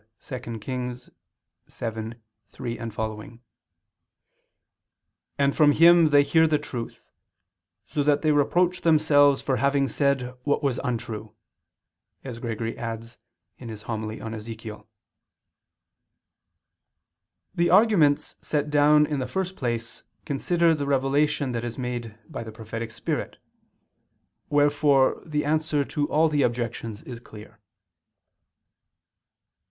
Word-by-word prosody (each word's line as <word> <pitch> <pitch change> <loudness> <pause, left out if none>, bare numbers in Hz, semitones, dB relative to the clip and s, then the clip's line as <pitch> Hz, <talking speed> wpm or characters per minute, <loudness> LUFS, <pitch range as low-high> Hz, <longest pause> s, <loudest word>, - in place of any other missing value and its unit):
2 130 - -6 0.2
Kings 125 +2 -5 0.6
7:3 110 0 -5 0.3
seqq.], 110 -1 -5 2.0
and 140 0 +2
from 150 -2 +5
Him 170 +1 +7
they 145 -1 +5
hear 160 +2 +4
the 155 -1 +2
truth, 125 -5 -7 0.7
so 150 - -2
that 145 +1 +2
they 155 - +3
reproach 175 +5 +2
themselves 145 -4 +4
for 135 -2 0
having 140 +2 +2
said 135 -3 0
what 145 +2 0
was 135 -3 0
untrue," 110 -4 -4 0.9
as 125 -3 -7
Gregory 115 -1 -4
adds 115 0 -6 0.4
(Hom. 120 - -8 0.4
i 110 - -6
super 115 - -7
Ezech.). 110 0 -8 2.7
The 170 0 +1
arguments 185 -8 +4
set 150 -1 -2
down 150 +1 +5
in 150 -2 -2
the 130 - -2
first 190 -1 -3
place 120 -2 -4 0.2
consider 165 +4 +2
the 145 -3 -2
revelation 140 +1 +1
that 120 -1 -3
is 120 -1 -5
made 120 -3 -5
by 150 -8 -6
the 110 - -8
prophetic 115 +1 -6
spirit; 110 - -4 1.1
wherefore 145 -2 +3
the 150 -2 -1
answer 155 -1 +1
to 145 +1 -2
all 160 +2 +3
the 150 -2 +1
objections 115 -3 -2
is 120 -2 -8
clear. 105 -2 -14
135 Hz, 115 wpm, -25 LUFS, 115-150 Hz, 2.7 s, Him